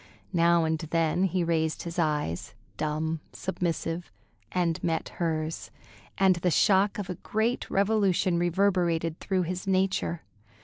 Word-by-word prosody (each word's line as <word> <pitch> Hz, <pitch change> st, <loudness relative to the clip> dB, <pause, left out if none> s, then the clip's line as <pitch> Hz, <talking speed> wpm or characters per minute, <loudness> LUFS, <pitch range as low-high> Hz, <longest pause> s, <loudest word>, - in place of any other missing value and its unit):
Now 170 Hz, -1 st, +4 dB
and 160 Hz, 0 st, 0 dB
then 165 Hz, +2 st, +1 dB
he 185 Hz, -1 st, 0 dB
raised 160 Hz, -2 st, 0 dB
his 170 Hz, 0 st, -5 dB
eyes, 150 Hz, -, -1 dB, 0.2 s
dumb, 155 Hz, +1 st, -1 dB
submissive, 170 Hz, -2 st, -3 dB, 0.4 s
and 175 Hz, -3 st, 0 dB
met 165 Hz, -1 st, -1 dB
hers, 160 Hz, -2 st, -2 dB, 0.5 s
and 190 Hz, -2 st, +4 dB
the 180 Hz, +1 st, +1 dB
shock 195 Hz, +3 st, +3 dB
of 205 Hz, -3 st, -4 dB
a 180 Hz, -, -3 dB
great 225 Hz, +3 st, -1 dB
revolution 195 Hz, -3 st, +2 dB
reverberated 175 Hz, -2 st, +1 dB
through 190 Hz, -2 st, 0 dB
his 180 Hz, +3 st, -4 dB
nature. 185 Hz, -3 st, 0 dB
170 Hz, 130 wpm, -28 LUFS, 165-190 Hz, 0.5 s, Now